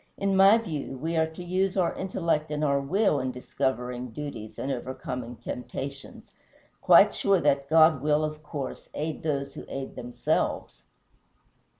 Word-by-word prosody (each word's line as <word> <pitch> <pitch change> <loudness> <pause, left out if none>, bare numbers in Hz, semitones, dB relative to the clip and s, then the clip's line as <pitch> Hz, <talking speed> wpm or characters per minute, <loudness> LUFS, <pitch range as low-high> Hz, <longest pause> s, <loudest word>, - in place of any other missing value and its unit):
In 195 -1 0
my 195 +3 +7
view 155 - -4
we 165 +5 -3
are 160 0 +3
to 160 +3 -9
use 185 +2 0
our 180 -2 +2
intellect 165 -5 -1
and 150 0 -2
our 140 -1 +2
will 170 +1 +2
in 130 0 -2
discovering 125 -1 -3
duties 115 -4 -7
and 140 - -3
overcoming 125 -1 -5
temptations, 135 +3 -7 0.5
quite - - +7
sure 195 -2 +2
that 140 -3 +1
God 160 -2 +6
will, 150 +1 +2
of 155 0 -4
course, 145 -3 -6
aid 155 +1 -3
those 140 -3 -2
who - - -8
aid 135 -1 -6
themselves." 120 - -2
145 Hz, 155 wpm, -27 LUFS, 130-165 Hz, 0.5 s, my